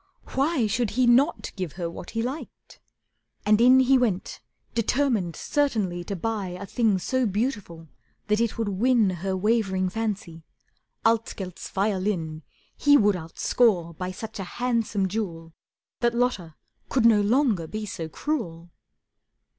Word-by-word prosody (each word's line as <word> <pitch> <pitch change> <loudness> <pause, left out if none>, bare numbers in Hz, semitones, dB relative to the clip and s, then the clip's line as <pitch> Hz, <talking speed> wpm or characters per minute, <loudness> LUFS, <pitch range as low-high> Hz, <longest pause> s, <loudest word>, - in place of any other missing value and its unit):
Why 275 -2 +1
Should 225 +2 0
he 255 - +4
not 255 +7 +3
give 185 -6 -4
her 175 -1 -3
what 170 +1 -8
he 225 0 -2
liked? 265 +6 -7 0.7
And 210 +1 +4
in 255 +2 +7
He 260 +1 +4
went, 210 -7 -1 0.3
determined 230 - 0
certainly 215 -12 -1
to 200 - -4
buy 195 -2 -3
A 200 - -6
thing 220 -2 +1
so 255 +6 0
beautiful 200 -6 -3 0.4
that 210 0 +1
it 235 -1 -1
would 225 -2 -1
win 220 +1 +3
Her 190 +2 -3
wavering 190 -3 +1
fancy. 195 -6 -4 0.6
Altgelt's 220 -5 -1
violin 190 -5 -1 0.3
He 290 0 +5
would 205 -5 +3
outscore 170 +1 +1
by 185 +3 -4
such 205 +3 -7
a - - -2
handsome 230 -5 0
jewel 170 -5 -4 0.5
That 235 -1 +1
Lotta 205 -10 -1 0.3
could 255 -4 +2
no 220 -3 +6
longer 215 - +2
be 215 +5 -5
so 165 -5 -5
cruel! 170 - -4
210 Hz, 140 wpm, -25 LUFS, 180-240 Hz, 0.7 s, in